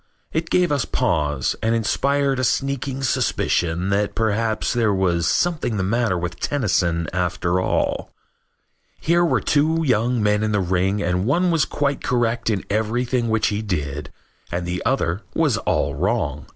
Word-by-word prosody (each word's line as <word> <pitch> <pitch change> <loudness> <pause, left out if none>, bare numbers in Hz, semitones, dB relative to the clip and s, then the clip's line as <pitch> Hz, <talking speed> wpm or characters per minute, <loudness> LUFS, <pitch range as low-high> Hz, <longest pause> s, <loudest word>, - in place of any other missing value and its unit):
It 165 +1 -1
gave 180 -3 +2
us 140 -4 +1
pause 75 - 0
and 115 +1 +1
inspired 140 +4 +1
a - - 0
sneaking 135 +1 -1
suspicion 90 -7 0
that 100 +1 0
perhaps 110 0 0
there 115 -3 +2
was 85 -3 +1
something 155 - 0
the 95 - 0
matter 110 -1 +1
with 85 0 -4
Tennyson 90 - 0
after 90 0 0
all. - - -1 0.9
Here 170 +2 +2
were 170 - +2
two 160 +3 +2
young 120 -2 +1
men 105 0 +2
in 110 -1 0
the 105 - +2
ring 95 +2 0
and 90 +2 0
one 175 +6 +2
was 165 -4 +2
quite 140 -1 -1
correct 120 -2 0
in 100 -4 -1
everything 115 +3 0
which 110 -1 +2
he 105 0 -2
did 75 -8 -3 0.4
and 85 0 -2
the 90 +1 -3
other 105 -8 0
was - - +2
all 70 - 0
wrong. 75 - -1
110 Hz, 160 wpm, -22 LUFS, 90-130 Hz, 0.9 s, gave